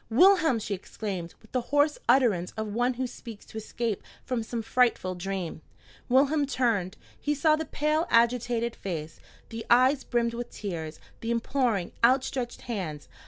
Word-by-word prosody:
"Wilhelm!" 325 - +5
she 210 -2 -3
exclaimed, 185 -2 -5
with 220 - -20
the 255 - 0
hoarse 290 +1 +3
utterance 230 -9 +3
of 215 -1 -3
one 245 +2 +1
who 260 +1 -1
seeks 230 -3 -9
to - - -10
escape 220 -1 -3 0.2
from 250 -3 -1
some 225 +1 -4
frightful 230 -6 +2
dream. 180 -3 -4 0.5
Wilhelm 280 +3 +3
turned. 225 -8 0 0.2
He 295 0 0
saw 305 +2 +4
the 320 +1 -3
pale, 305 +3 0
agitated 235 0 +2
face, 160 -5 -5 0.3
the 225 0 -6
eyes 255 +3 +5
brimmed 235 -1 0
with 240 +1 -5
tears, 165 -6 -5 0.2
the 230 - -4
imploring, 235 -5 0
out 255 +3 +5
stretched 245 -3 -4
hands. 170 - -5
235 Hz, 160 wpm, -28 LUFS, 205-260 Hz, 0.5 s, Wilhelm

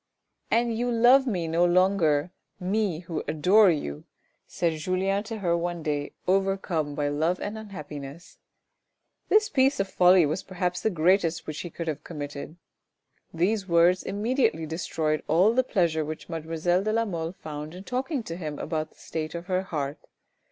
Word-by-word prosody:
" - - -54
And 235 0 +2
you 245 +2 -1
love 245 +3 +5
me 180 -8 -1
no 165 +2 +2
longer, 175 -3 +3 0.3
me, 185 -2 -1
who 165 -3 -4
adore 185 +7 +5
you! 75 - -2 0.2
" - - -43
said 165 -2 -1
Julien 190 +4 0
to 225 +1 -5
her 175 -5 +1
one 170 -1 -3
day, 145 -1 -2
overcome 190 -6 0
by 145 0 0
love 160 +5 0
and 205 +1 -4
unhappiness. 155 -7 -9 0.9
This 425 0 +5
piece 270 0 +2
of 195 - +1
folly 180 -2 +5
was 155 +6 -1
perhaps 180 -1 -3
the - - +2
greatest 175 -1 +2
which 155 -1 -5
he 175 - -5
could 170 +1 -6
have 155 -1 -3
committed. 145 -1 -7 0.8
These 195 +4 0
words 170 +1 +4
immediately 210 - 0
destroyed 155 -1 -2
all 185 +8 +4
the 255 +2 +3
pleasure 170 -9 +1
which 155 +1 -7
mademoiselle 165 +2 0
de 215 +2 -1
la 230 +1 +2
Mole 165 -4 -4
found 155 -1 -7
in 185 - -9
talking 260 +3 -2
to 165 -6 -6
him 155 -4 -5
about 155 -2 -3
the - - -28
state 155 0 -5
of 170 0 -5
her 185 0 0
heart. 150 -6 -4
175 Hz, 175 wpm, -26 LUFS, 155-200 Hz, 0.9 s, love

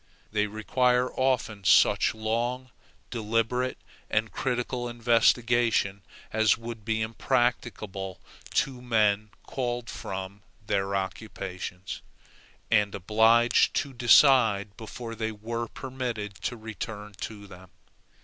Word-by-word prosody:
They 105 0 +1
require 125 +4 +1
often 125 -6 0
such 95 - +5
long, 120 +4 -2 0.4
deliberate, 115 +2 0 0.3
and 110 0 0
critical 125 -1 -2
investigation 115 -3 +2 0.3
as 110 0 +4
would 115 -1 -7
be 110 0 0
impracticable 110 -5 -1 0.4
to 130 -2 0
men 105 -3 +2 0.2
called 120 -3 -3
from 95 +1 -6 0.2
their 100 0 0
occupations, 95 -1 -5 0.7
and 105 -2 +3
obliged 110 +5 +4
to 140 - -1
decide 120 -5 +5
before 115 +2 -7
they 110 0 -2
were 115 +2 -4
permitted 120 -6 -5
to 120 - -2
return 105 -1 -7
to 105 -2 -6
them. 95 -1 -13
110 Hz, 100 wpm, -27 LUFS, 105-120 Hz, 0.7 s, such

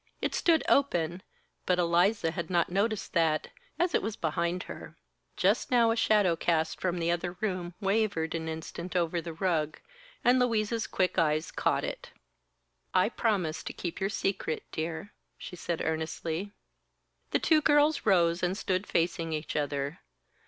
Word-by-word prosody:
It - - -1
stood 330 -3 +3
open, 175 - +2 0.5
but 180 - +3
Eliza 175 +1 +2
had 170 -1 -4
not 175 -1 +1
noticed 210 +3 0
that, 160 -3 +2 0.3
as 345 0 +1
it - - +3
was 215 +1 -3
behind 170 +2 -1
her. - - -10 0.4
Just - - +2
now 235 -2 +4
a - - +1
shadow 210 -6 +3
cast 160 -1 0
from 180 -1 0
the 170 0 +1
other 175 +1 -2
room 180 -3 -3
wavered 195 -5 0
an 160 -1 -3
instant 165 +3 -6
over 170 -1 +1
the 170 - -6
rug, 160 -3 -1 0.4
and 250 +1 +5
Louise's 225 -4 +1
quick 185 -1 0
eyes 155 0 +1
caught - - 0
it. - - -5 0.9
"I - - +4
promise 190 -9 0
to - - -6
keep 175 0 -5
your 195 - +1
secret, 195 -5 -2
dear," 160 +5 -4 0.2
she 180 - -8
said 170 -1 -3
earnestly. 160 +4 -3 0.8
The - - +2
two 315 -2 +3
girls 295 +1 +4
rose 175 -4 +3
and 180 +2 0
stood 190 -1 -1
facing 165 -1 0
each 155 0 -4
other. 145 +2 -2
175 Hz, 160 wpm, -29 LUFS, 165-210 Hz, 0.9 s, and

